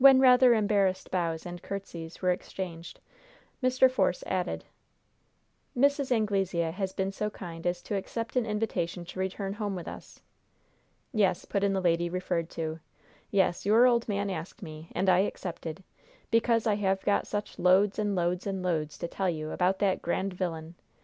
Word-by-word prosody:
When 270 -1 +9
rather 250 -2 +7
embarrassed 200 -3 +1
bows 165 -3 -1
and 175 0 -7
courtesies 180 -4 -7
were 180 - +4
exchanged, 175 -2 -5 0.6
Mr. 255 +1 +5
Force 260 - +1
added: - - -2 1.1
"Mrs. 280 0 +3
Anglesea 195 -7 +1
has 190 +2 -3
been 190 0 -2
so 210 +2 -2
kind 170 -4 -6
as 175 0 -1
to 205 - -3
accept 230 +5 -4
an 250 - +3
invitation 190 -5 -2
to 180 - -8
return 195 +1 -2
home 205 -2 -3
with 175 - -6
us." - - -9 0.9
"Yes," 195 -5 +2
put 200 - -1
in 200 -1 +2
the 190 - 0
lady 170 -1 +2
referred 175 -2 -2
to. 160 0 -4 0.5
"Yes, 190 -3 +2
your 220 +5 +6
old 235 -2 +3
man 200 -1 -1
asked 185 +5 -6
me, 155 -1 -9
and 190 - 0
I 180 -1 +6
accepted, 175 -3 -3 0.5
because 230 0 +3
I 210 -2 +2
have 195 -2 0
got 205 - +2
such 205 0 -4
loads 190 +3 +4
and 205 -1 0
loads 175 +1 0
and 190 -2 -2
loads 155 -4 -1
to - - -3
tell 190 +2 -1
you 155 -2 -3
about 185 +1 +1
that 195 -1 +1
grand 190 +3 -1
vilyun. 165 -3 -4
190 Hz, 170 wpm, -29 LUFS, 175-210 Hz, 1.1 s, When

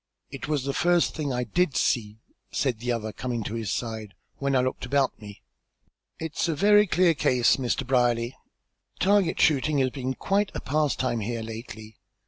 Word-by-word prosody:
"It 135 -1 -6
was 150 -3 0
the 140 0 -2
first 175 +2 +2
thing 150 -3 -3
I 125 0 -1
did 150 - 0
see," 105 -3 0 0.3
said 125 -6 -1
the 120 +1 -2
other, 110 -2 -3
coming 120 -3 -3
to 105 - -5
his 115 -4 -3
side, 110 -4 -4 0.2
"when 140 -1 0
I 130 - +4
looked 130 0 -2
about 135 -1 0
me. 105 -1 -11 0.7
It's 160 +1 -2
a 165 - 0
very 205 +4 +5
clear 175 0 +3
case, 125 -5 +3
Mr. 130 +1 -1
Brierly. 120 -1 +1 0.6
Target 195 -3 +2
shooting 150 0 +3
has 130 -2 +2
been 130 -1 -3
quite 200 +6 0
a - - -2
pastime 135 -5 0
here 115 +2 -3
lately. 110 -1 -9
130 Hz, 175 wpm, -26 LUFS, 115-155 Hz, 0.7 s, very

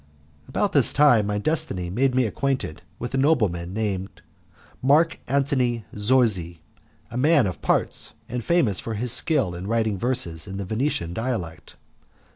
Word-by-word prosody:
About - - 0
this - - +5
time 130 -8 +5
my 105 0 -1
destiny 100 - -1
made 125 +5 +1
me 130 -1 +3
acquainted 130 - -2 0.2
with 120 +2 -6
a 135 - +1
nobleman 100 - +1
called 100 -3 -3 0.6
Mark 150 +5 +3
Antony 130 -4 0
Zorzi, 105 -7 +1 0.5
a 120 - -4
man 145 -1 +4
of 90 -6 -4
parts - - 0
and 120 -1 -4
famous 130 - +2
for 115 - -4
his 120 +3 -2
skill 135 - +1
in 90 +2 -6
writing 110 -3 0
verses 85 -9 -2
in 95 0 -6
the 100 - -4
Venetian 110 - -1
dialect. 110 -8 -4
115 Hz, 150 wpm, -24 LUFS, 95-130 Hz, 0.6 s, this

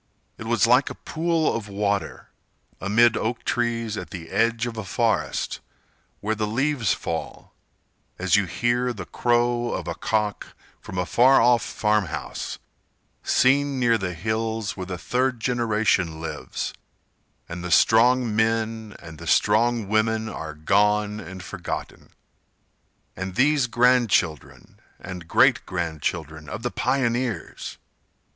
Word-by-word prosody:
It 110 - -7
was 115 -2 +3
like 125 +3 +4
a - - -7
pool 165 0 0
of 115 -2 -4
water, 100 0 -2 0.5
Amid 115 +4 +4
oak 115 +2 -2
trees 115 -2 -1
at - - -6
the 85 -4 -8
edge 115 +1 +1
of 120 -1 -5
a 110 - -4
forest, 110 +3 -1 0.6
Where 110 +2 0
the 105 -1 -2
leaves 130 -1 0
fall, 80 -1 -4 0.6
As 95 +2 +2
you 100 -1 +3
hear 120 +6 0
the 105 - -7
crow 120 0 +1
of 85 - -4
a 85 - -2
cock 105 +2 -2 0.2
From 90 - -8
a 90 - 0
far 130 +7 +5
off 120 -1 +4
farm 105 -3 0
house, - - -5 0.6
seen 140 +1 +2
near 120 -2 +3
the 90 -2 -3
hills 110 +3 -2
Where 95 -2 -6
the 90 -1 -4
third 125 +5 -1
generation 110 -8 +1
lives, 80 - -5 0.7
and 85 0 -7
the 90 - -4
strong 115 +4 +4
men 110 -1 0
And 80 -2 -10
the - - -9
strong 115 +1 +2
women 110 +1 +1
are 80 -7 -6
gone 105 +5 +2
and 95 -1 -9
forgotten. 90 -1 -6 1.1
And 95 0 -5
these 140 0 +3
grand 125 0 +3
children 80 -7 -1 0.2
and 90 -2 -8
great - - +4
grand 85 -4 -3
children 80 -1 -4
Of - - -6
the 120 - -1
pioneers! 120 -7 -2
110 Hz, 140 wpm, -24 LUFS, 95-120 Hz, 1.1 s, far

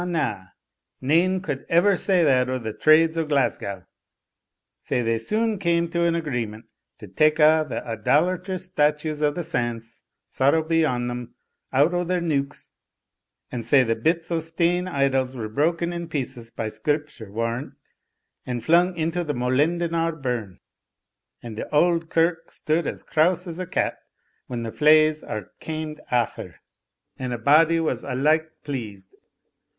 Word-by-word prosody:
nane 170 +8 +2
could 145 -7 -4
ever 180 +4 +4
say 180 -1 +2
that 130 -4 +3
o' 130 - 0
the 110 -3 -5
trades 160 +4 +4
o' - - +1
Glasgow 130 - -1 0.9
Sae 125 - -1
they 115 0 0
sune 215 - -1
came 170 -2 +1
to 170 - 0
an 170 0 +2
agreement 120 -9 -3 0.3
to 105 - -11
take 155 +11 +2
a' 155 0 +5
the - - -4
idolatrous 180 - 0
statues 150 -3 0
of 150 -1 +1
sants 120 -8 -3 0.3
(sorrow 140 +4 +2
be 165 0 +2
on 125 -5 0
them) 120 0 -6 0.4
out 145 +6 +3
o' 175 0 +1
their 180 +1 0
neuks 145 -4 -2 0.8
and 120 -2 -4
sae 130 +4 +4
the 115 -1 0
bits 165 +9 -1
o' 165 - +1
stane 170 +2 0
idols 135 -5 0
were 115 -3 -4
broken 165 +8 0
in 170 -1 -5
pieces 130 -6 -4
by 115 -1 -4
Scripture 125 0 -3
warrant, 115 +4 -3 0.7
and 120 -2 -4
flung 175 +2 +3
into 165 +2 -1
the 150 -3 -3
Molendinar 165 +6 0
burn, 120 -8 -4 0.8
and 115 -2 -7
the - - -6
auld 165 +1 +2
kirk 165 0 +1
stood 160 +2 -1
as - - -5
crouse 175 +3 +1
as 170 -1 -7
a 185 - -4
cat - - -1 0.5
when 120 -2 -4
the 115 - -4
flaes 155 +2 +4
are 105 - -6
kaimed 155 -1 -5
aff 120 -1 0
her, - - -8 0.6
and 130 -1 -3
a' - - -2
body 155 +7 +4
was 155 -7 -1
alike 155 +5 +1
pleased. 105 -9 -6
150 Hz, 155 wpm, -24 LUFS, 125-165 Hz, 0.9 s, a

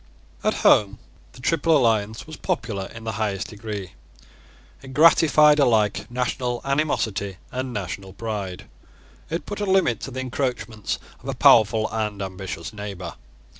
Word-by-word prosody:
At - - +2
home 105 0 +5 0.4
the 125 - -13
Triple 165 +2 +3
Alliance 110 -4 +1
was 155 - -9
popular 100 -5 -3
in 115 - -11
the 110 - -2
highest 100 -3 -1
degree. 105 -4 -6 0.9
It 135 0 -10
gratified 150 -1 +6
alike 110 -7 +2
national 125 0 -2
animosity 110 -9 -1
and 130 +1 -3
national 95 -2 -5
pride. 100 -4 -5 0.6
It 165 +2 -3
put 205 - -5
a - - +1
limit 190 - +3
to - - -6
the 130 0 -4
encroachments 125 -4 -3 0.2
of - - -7
a - - -2
powerful 110 0 +5
and 105 -2 -2
ambitious 95 -2 -6
neighbour. 100 -4 -6
110 Hz, 140 wpm, -23 LUFS, 100-130 Hz, 0.9 s, gratified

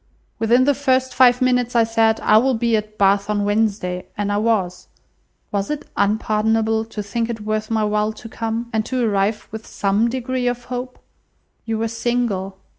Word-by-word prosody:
Within 235 +3 +4
the 285 +2 +3
first 260 -2 +1
five 250 0 +5
minutes 250 -1 +1
I 230 - +5
said, 225 0 +2
'I 215 - +5
will 265 +3 +2
be 230 0 +1
at 215 0 -4
Bath 200 +1 +2
on 205 -1 0
Wednesday,' 205 -4 -1
and 205 0 -1
I 205 - +1
was. 205 -5 0 0.6
Was 200 -2 -2
it 300 -1 -4
unpardonable 220 +2 +1
to 220 -2 -6
think 230 +3 -2
it 225 -2 -4
worth 215 0 -2
my 220 -1 +1
while 210 0 0
to 225 - -11
come? 225 +1 -4
and 220 -1 +1
to 255 -2 0
arrive 205 +1 0
with 220 0 -8
some 205 +4 +1
degree 255 0 -2
of 245 0 -2
hope? 250 +1 -5 0.7
You 225 -1 -2
were 225 +1 -1
single. 230 -5 -2
225 Hz, 185 wpm, -20 LUFS, 210-240 Hz, 0.7 s, five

